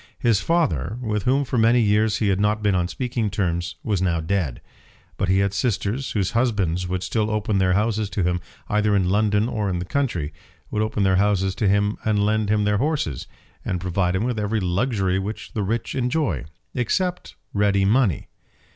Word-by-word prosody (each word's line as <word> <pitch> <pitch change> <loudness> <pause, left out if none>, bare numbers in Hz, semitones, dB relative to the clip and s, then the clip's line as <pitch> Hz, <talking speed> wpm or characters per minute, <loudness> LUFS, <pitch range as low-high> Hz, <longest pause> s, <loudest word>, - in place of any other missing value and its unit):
His 115 -5 +2
father, 110 - 0
with 105 -5 -2
whom 135 +3 +2
for 125 -1 -1
many 115 +2 +5
years 105 -1 +2
he 105 - +1
had 95 0 +1
not 105 +1 +1
been 105 -1 +3
on 90 -1 +1
speaking 120 0 -2
terms, 85 -3 -2
was 105 -5 0
now 85 -3 +1
dead; 80 -5 -1 0.6
but 95 - -1
he 95 - +4
had 100 0 +1
sisters 115 +3 -1
whose 100 -4 0
husbands 100 -8 0
would 90 0 -2
still 110 -2 0
open 105 -2 0
their 90 -1 +3
houses 105 +1 0
to 95 +1 -1
him, 90 0 0 0.3
either 105 -1 +2
in 95 -2 +2
London 105 +1 +2
or 110 -4 -1
in 90 - -1
the 90 - -3
country; 90 - -1 0.4
would 105 - 0
open 110 -1 0
their 95 -1 +3
houses 95 -1 +2
to 105 - 0
him, 100 +1 +1
and 105 -2 +2
lend 110 -1 +1
him 105 0 +2
their 105 0 +1
horses, 140 - -1 0.4
and 90 - -2
provide 90 0 0
him 95 - 0
with 120 -2 -1
every 105 +1 0
luxury 95 0 0
which 105 +3 -6
the 110 - -1
rich 110 +4 -2
enjoy, 125 - -1 0.3
except 180 - -1 0.2
ready 100 -1 +2
money. 105 - +2
105 Hz, 195 wpm, -23 LUFS, 95-110 Hz, 0.6 s, many